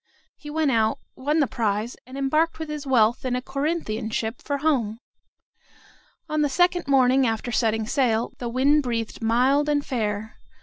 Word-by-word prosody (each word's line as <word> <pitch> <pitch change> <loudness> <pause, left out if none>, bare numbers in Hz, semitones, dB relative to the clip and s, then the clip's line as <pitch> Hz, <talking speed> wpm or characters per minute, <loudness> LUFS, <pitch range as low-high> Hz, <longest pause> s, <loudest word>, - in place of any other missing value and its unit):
He 295 - -11
went, 305 -2 +1 0.4
won 295 +4 0
the - - +4
prize, 215 -1 -2
and 260 +1 -9
embarked 305 +4 +1
with 320 -1 -6
his 300 -2 -5
wealth 235 -3 +3
in 255 -1 -1
a - - 0
Corinthian 270 -6 -2
ship 225 +1 -3
for 285 - -2
home. 260 -8 0 1.3
On 305 -1 0
the 295 - +2
second 355 +2 +2
morning 265 -1 +4
after 225 +2 -2
setting 220 -2 +1
sail, 235 -2 0
the 240 - -3
wind 275 +5 +3
breathed 230 -4 -3
mild 255 +6 +2
and 290 -1 +1
fair. 220 -3 -3
260 Hz, 165 wpm, -24 LUFS, 225-295 Hz, 1.3 s, the